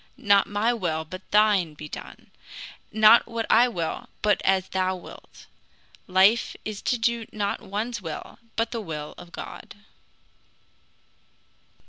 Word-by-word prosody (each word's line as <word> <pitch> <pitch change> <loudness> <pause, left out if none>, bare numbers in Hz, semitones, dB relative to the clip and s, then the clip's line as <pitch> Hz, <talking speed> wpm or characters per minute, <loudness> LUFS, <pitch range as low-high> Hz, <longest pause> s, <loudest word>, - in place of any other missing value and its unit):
Not 205 -6 +4
my 210 +4 +1
will, 165 -8 -2
but 185 +4 -10
thine 205 -7 +3
be 150 +1 -8
done; - - -10 0.6
not 220 +2 +6
what 230 -1 -3
I 240 +3 +6
will, 170 -9 -4
but 210 -1 +3
as 190 -1 +2
thou 185 0 0
wilt. 180 - -13 0.6
Life 190 +5 +4
is 215 -2 -5
to 250 - 0
do 235 -1 0
not 205 -1 -2
one's 215 +3 -4
will, 165 +4 -7 0.2
but 230 0 0
the 230 - -3
will 150 -6 -6
of 175 - -12
God. - - -9
205 Hz, 135 wpm, -25 LUFS, 185-225 Hz, 0.6 s, not